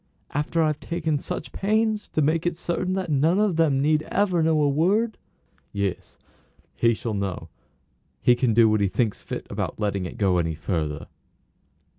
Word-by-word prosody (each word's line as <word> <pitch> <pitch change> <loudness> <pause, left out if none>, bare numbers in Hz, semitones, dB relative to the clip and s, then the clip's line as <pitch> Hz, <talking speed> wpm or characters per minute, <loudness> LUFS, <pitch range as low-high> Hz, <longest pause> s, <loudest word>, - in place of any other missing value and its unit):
"After 150 +3 0
I've 155 -1 0
taken 160 -3 -2
such 150 - -5
pains 215 +1 0
to 155 - 0
make 160 +3 +1
it 175 - -1
certain 180 +2 -2
that 185 -3 -2
none 155 +6 +3
of 210 -5 +2
them 155 -5 +3
need 155 +2 +2
ever 185 -4 +1
know 160 -1 +3
a - - +3
word?" 195 +11 +2 0.6
"Yes; 100 -2 -3 0.6
he 115 -1 +2
shall 115 0 -4
know; 100 -3 -3 0.7
he 125 - +5
can 120 -2 +1
do 115 -1 +6
what 110 -1 +2
he 100 - +3
thinks 105 +3 -1
fit - - -6
about - - -3
letting 100 -3 -1
it - - -10
go 95 -5 +2
any 80 -1 -1
further." 75 -1 -3
150 Hz, 175 wpm, -24 LUFS, 105-175 Hz, 0.7 s, do